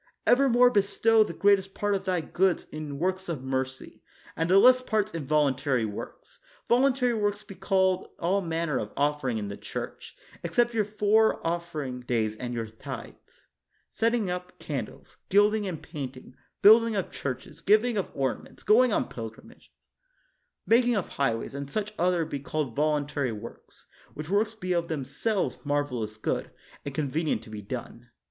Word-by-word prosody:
Evermore 245 -1 +5
bestow 215 +2 +4
the - - -5
greatest 195 -1 +2
part 205 0 0
of 195 0 -2
thy 180 -2 +1
goods 185 +3 +1
in 150 -2 -6
works 185 +3 -1
of 150 -6 -4
mercy, 130 0 -4 0.3
and 165 +1 -1
the 190 - +6
less 255 +5 +7
parts 215 -4 0
in 160 -5 -5
volun 150 -3 +3
tary 130 -4 0
works. 105 -1 -8 0.3
Voluntary 250 0 +3
works 205 -2 -1
be - - -10
called 190 0 +1
all 190 +4 +1
man 165 -1 -2
ner 135 - 0
of 105 - -5
offering 145 -4 0
in 105 -2 -3
the 100 - -5
church, - - -7 0.2
except 240 0 +1
your 215 -2 +1
four 210 +1 +3
offering 165 -6 -3
days 115 -3 -1
and 120 +2 -5
your 115 -1 -2
tithes, 110 0 -10 0.5
setting 230 -2 +1
up 180 0 -6
can 135 -7 -3
dles, - - -17
gilding 205 +1 +3
and 170 -5 -5
painting, 135 -5 -7 0.3
building 225 +2 +7
of 195 - -2
churches, 140 +3 -6
giving 215 +6 +3
of 200 - -1
ornaments, 135 -2 -3
going 240 +4 +5
on - - +1
pilgrimages, 115 - -10 1.0
ma 230 - +6
king 245 -1 +2
of 200 - -2
highways, 115 -4 -1
and 140 0 -5
such 210 +5 -3
other 175 -1 +2
be 145 -3 -4
called 140 -3 -3
vol 150 0 +2
untary 145 -3 -2
works; 115 - -12 0.3
which 155 +3 -6
works 215 +2 +1
be 185 -4 -2
of 170 -1 0
themselves 160 - -2
mar 145 0 +1
velous 110 -6 -5
good, - - -2 0.3
and 140 -1 -6
convenient 150 -4 -1
to 110 - -13
be 105 -1 -6
done. 120 +2 -7
170 Hz, 170 wpm, -27 LUFS, 135-210 Hz, 1.0 s, less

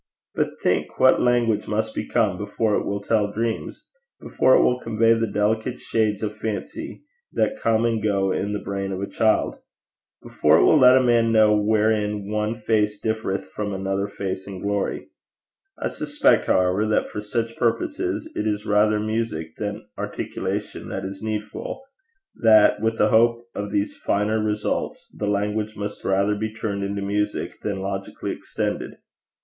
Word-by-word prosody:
But - - -2
think - - 0
what - - +5
language 120 -3 +2
must 110 +1 -1
become 110 -6 0
before 105 +2 -1
it - - 0
will 100 0 -2
tell 105 0 +1
dreams! 115 - -3 0.3
before 130 - +3
it - - +5
will 125 0 +2
convey 115 -1 +3
the 115 0 0
delicate 110 +4 0
shades 110 -2 0
of 105 0 -3
fancy 110 -2 -5 0.3
that 270 0 0
come 115 0 +2
and 115 -2 0
go 100 -2 +1
in 100 +2 -1
the 105 - -1
brain 100 -1 -4
of 95 - -3
a 100 - -2
child! 110 +1 +1 0.7
before - - +3
it - - +4
will - - +5
let 125 0 +8
a 130 - +3
man 120 -2 +3
know 110 -1 +5
wherein 105 -1 +1
one 105 +1 -1
face 105 -2 0
differeth 110 -3 -2
from 105 -2 -4
another 95 +1 -1
face 95 -1 -5
in 95 -2 -7
glory! 100 -1 -2 0.7
I - - -2
suspect, 290 0 +1
however, 95 +3 +2
that 105 - 0
for 105 - -4
such 115 +2 -3
purposes 315 - -1
it - - -1
is 105 0 -2
rather 105 +1 +3
music 110 -8 -3
than 105 +1 -4
articulation - - -4
that - - -4
is 95 0 -7
needful 110 - -5 0.6
that, 110 -2 +6
with 115 0 0
a - - +4
hope 115 +1 +3
of 105 0 -4
these 100 +1 -1
finer 105 +2 0
results, 105 0 -2
the 105 - -3
language 105 +1 -1
must 105 0 -5
rather 100 +2 +2
be 110 +1 -3
turned 105 -3 -3
into 100 0 -3
music 105 +1 -2
than 100 -2 -3
logically 95 0 -4
extended. - - -4
105 Hz, 165 wpm, -23 LUFS, 100-110 Hz, 0.7 s, let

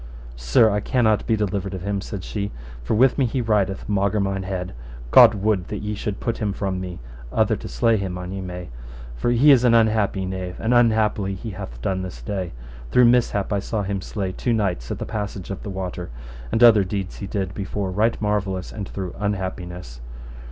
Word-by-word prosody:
Sir, - - +4
I 105 - +1
cannot 110 -1 +1
be 115 - +3
delivered 100 -2 -2
of 90 - -6
him, 100 0 -1
said 100 -1 -6
she, 100 -1 -3 0.3
for - - 0
with 130 +5 +4
me 130 - +3
he 130 - -2
rideth 105 -5 0
maugre 100 +1 +1
mine 100 -1 -1
head: 95 -1 -4 0.4
God 110 - +8
would 100 -3 0
that 105 -1 -5
ye 105 0 -2
should 105 -1 -4
put 115 - -2
him 105 -3 -1
from 95 -2 -2
me, 90 -2 -6 0.3
other - - +2
to - - -8
slay 110 - +2
him 95 -3 -3
an 90 0 -6
ye 95 0 -4
may, 90 -1 -6 0.5
for - - -1
he 125 +5 +6
is 130 -3 +6
an 120 -2 +5
unhappy 110 -4 +2
knave, 95 -1 -4
and 115 +2 +1
unhappily 110 -4 +3
he 110 +3 -6
hath 95 -11 -8
done 95 -1 0
this 95 -1 -7
day: 95 -5 -3 0.4
through 125 - +6
mishap 115 -4 +2
I 100 - +1
saw 105 +1 -2
him 100 0 -2
slay 95 -1 -3
two 120 +5 -1
knights 95 - -1
at - - -3
the - - -4
passage 100 -3 -5
of 100 - -5
the - - -6
water; 90 -2 -5 0.4
and 115 - +3
other 110 -4 +8
deeds 95 0 -4
he 100 - -6
did 95 -1 -3
before 100 -1 -3
right 110 +5 +1
marvellous 100 -3 -1
and 100 -3 -6
through 95 -3 -5
unhappiness. 90 -10 -4
100 Hz, 210 wpm, -23 LUFS, 95-110 Hz, 0.5 s, God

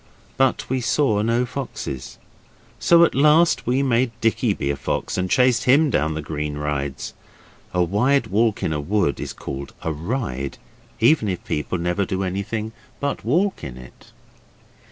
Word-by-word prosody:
But 135 -1 +1
we 130 0 -1
saw 115 -4 +2
no 115 +3 +1
foxes. 120 - -6 0.6
So 170 0 +6
at - - +3
last 150 +3 +4
we 130 +3 +2
made 125 -1 +2
Dicky 115 0 +1
be 70 - -1
a - - -2
fox, 70 - -3
and 90 0 -1
chased 125 +1 +3
him 145 +3 +5
down 80 0 +1
the 80 - -4
green 75 -1 -4
rides. 75 -2 -3 0.6
A 90 -1 +2
wide 115 +9 +2
walk 110 +1 +1
in 80 - 0
a 75 - -2
wood 90 -2 0
is - - -4
called 70 +1 -7
a 80 - -1
ride, 75 - -3 0.4
even 115 -1 +4
if 90 - -3
people 75 +4 -2
never 90 +3 0
do 95 0 -2
anything 100 +4 -3 0.3
but 140 0 -2
walk 180 - +1
in 65 -3 -6
it. 65 0 -15
105 Hz, 165 wpm, -22 LUFS, 80-130 Hz, 0.6 s, So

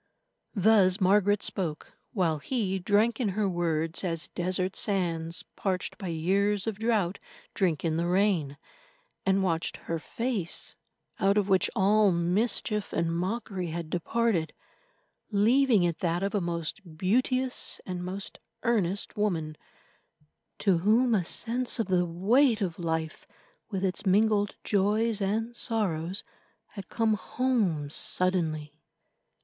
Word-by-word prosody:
Thus 195 -2 +4
Margaret 205 +1 +3
spoke, 165 -5 -3 0.2
while 170 - 0
he 195 - -1
drank 215 +5 +2
in 235 -5 +1
her 210 -2 +2
words 165 -2 -1
as 165 -3 -1
desert 185 +1 -1
sands, 170 -5 -1
parched 190 +1 -2
by 195 - -5
years 195 +5 +1
of 220 -2 -3
drought, 215 -5 0 0.3
drink 175 -5 0
in 160 -1 0
the 170 +1 0
rain—and 195 - -1
watched 165 -3 -1
her 165 -1 -4
face, 225 -2 -3 0.4
out 195 +1 +3
of 205 -1 +1
which 190 -1 +3
all 205 +1 +4
mischief 200 +4 0
and 165 0 0
mockery 190 0 -3
had 165 -1 -5
departed, 180 -1 0 0.8
leaving 225 +1 +4
it 170 -2 0
that 175 +1 0
of 200 - -1
a 205 - +1
most 170 +3 -3 0.2
beauteous 255 +7 0
and 180 -1 -4
most 190 +2 -6 0.2
earnest 205 -5 0
woman, 165 -7 -1 1.0
to 190 -5 +2
whom 225 +6 +3
a 195 -5 +2
sense 240 +9 0
of 225 - 0
the 180 -1 +2
weight 220 +8 +3
of 185 -5 -3
life, 160 -1 -3 0.4
with 195 -2 -2
its 185 - -1
mingled 205 +1 +2
joys 210 +2 +1
and 225 +4 -1
sorrows, 190 -7 -1 0.5
had 200 -2 -10
come 225 -1 +1
home 210 - 0
suddenly. 160 -5 0
195 Hz, 130 wpm, -28 LUFS, 170-215 Hz, 1.0 s, Thus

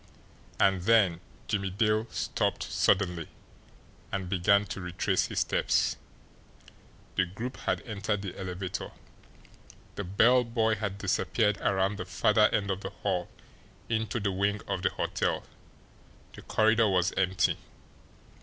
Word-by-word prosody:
And 95 -2 +3
then 95 -4 +4 0.3
Jimmie 100 -1 -1
Dale 110 +3 +1
stopped - - -1
suddenly, 90 -4 +1 0.8
and 95 -2 -3
began 100 +2 +3
to 95 - -6
retrace 90 0 0
his - - -1
steps. - - +1 1.2
The 90 - +4
group 115 +9 -6
had - - -2
entered 105 -2 -3
the 95 - -5
elevator, 95 0 -5 1.0
the 100 - -4
bell 115 +7 +4
boy 115 -1 +1
had 100 -2 -3
disappeared 105 +1 +1
around 95 +1 +1
the 95 - -5
farther 105 +4 +3
end 100 -1 0
of 95 +1 -3
the 95 - -4
hall 95 -3 -2 0.6
into 110 0 -1
the 100 -2 0
wing 100 +2 0
of - - -2
the - - +2
hotel - - -1 0.9
the - - -11
corridor 110 0 +3
was 90 -1 +2
empty. 95 -1 +1
100 Hz, 130 wpm, -29 LUFS, 95-110 Hz, 1.2 s, then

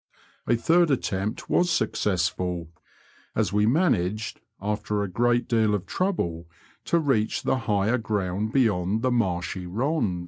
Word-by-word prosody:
A 120 - +4
third 165 +8 +3
attempt 105 -6 -2
was 175 - +2
snocessfol, 90 - -1 0.7
as 105 -4 0
we 105 +1 +3
managed* 110 - +1 0.2
after 105 0 -2
a - - -2
great 120 +5 +1
deal 110 -3 +2
of 95 -2 -4
trouble, 85 - -2 0.4
to 170 - +2
reach 135 -9 +1
the 130 - +1
higher 105 +4 +2
groimd 105 -1 -2
bejond 110 -5 +1
the 130 - +2
marshj 95 -5 -1
rond. 115 - 0
105 Hz, 135 wpm, -25 LUFS, 95-120 Hz, 0.7 s, A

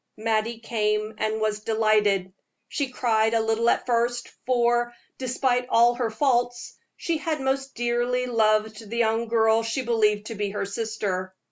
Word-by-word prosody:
Mattie 225 +1 0
came, 215 -1 -1
and 215 0 -1
was 215 -1 0
delighted. 210 -4 +1 0.3
She 285 -3 -2
cried 225 -3 +1
a - - +4
little 225 +1 +1
at - - +1
first, 240 0 0 0.2
for, 240 -1 +2 0.2
despite 250 -1 0
all 235 +1 +5
her 240 -1 -1
faults, 245 0 0 0.2
she 330 -2 -2
had 310 0 -2
most 270 0 -2
dearly 240 +1 0
loved 215 -2 +1
the 235 - -4
young 230 0 +1
girl 225 0 +3
she 230 +3 -2
believed 215 -3 +1
to 225 - -5
be 205 -1 -2
her 200 0 -3
sister. 200 -3 -3
230 Hz, 155 wpm, -25 LUFS, 215-240 Hz, 0.3 s, all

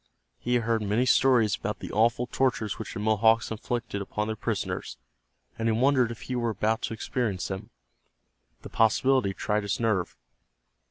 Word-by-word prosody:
He 125 +1 0
had 120 - +1
heard 115 -1 +1
many 105 +4 +1
stories 125 -5 +4
about 105 0 -4
the - - -8
awful 115 +3 +2
tortures 125 -4 -1
which 110 - -6
the - - -4
Mohawks 110 +2 +3
inflicted 115 -1 -3
upon 105 +2 -3
their 110 0 -3
prisoners, - - -3 0.6
and 115 - 0
he 115 - +3
wondered 130 +1 +3
if 115 -2 -8
he 130 - -4
were 120 -1 0
about 110 +1 0
to 115 - -4
experience 110 -6 -2
them. 95 +2 -6 0.9
The - - -8
possibility 115 -1 +2
tried 105 0 0
his 100 -1 -2
nerve. 110 -6 0
110 Hz, 170 wpm, -27 LUFS, 105-120 Hz, 0.9 s, stories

